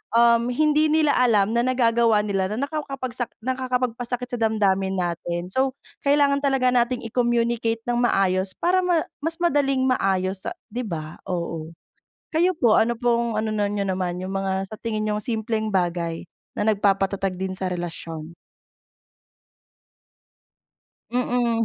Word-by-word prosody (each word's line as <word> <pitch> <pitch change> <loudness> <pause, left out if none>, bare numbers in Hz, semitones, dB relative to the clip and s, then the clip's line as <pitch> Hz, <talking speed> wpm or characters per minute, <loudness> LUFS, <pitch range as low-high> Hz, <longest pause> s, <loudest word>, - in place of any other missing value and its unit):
um, 235 0 +5
hindi 305 +4 +3
nila 310 -2 +3
alam 225 -4 +3
na 235 - +3
nagagawa 235 -4 +3
nila 195 -2 0
na 250 +6 -1
nakawkapagsak 260 -5 -4 0.2
nakakapagpasakit 250 -1 -1
sa 245 - -3
damdamin 195 -3 +1
natin, 175 0 -2
so 260 +4 +1 0.3
kailangan 280 0 +4
talaga 270 -2 +3
natin 245 0 +1
i-communicate 235 -1 0
nang 240 0 +1
maayos 190 -4 +2
para 365 +2 +2
ma 350 -3 +2 0.2
mas 325 +1 -1
madaling 280 -6 +2
maayos 190 -5 0
sa - - -2 0.2
di 240 +3 -3
ba? 160 -7 -5
Oo. 170 -3 -3 0.6
Kayo 350 +4 +3
po, 235 -8 +4
ano 235 +2 +2
pong 235 -2 +1
ano 220 - -2
niyo 205 -1 -1
naman, 180 -1 -2
yung 190 +1 -5
mga 195 0 -2
sa 215 - -8
tingin 215 -2 -2
niyong 210 0 -1
simpleng 220 -1 -1
bagay 170 -2 -1 0.3
na 210 - 0
nagpapatatag 195 -2 +1
din 190 0 -2
sa 190 - -2
relasyon? 165 -2 -6 2.8
Mm. 240 -2 +1
225 Hz, 135 wpm, -24 LUFS, 190-250 Hz, 2.8 s, um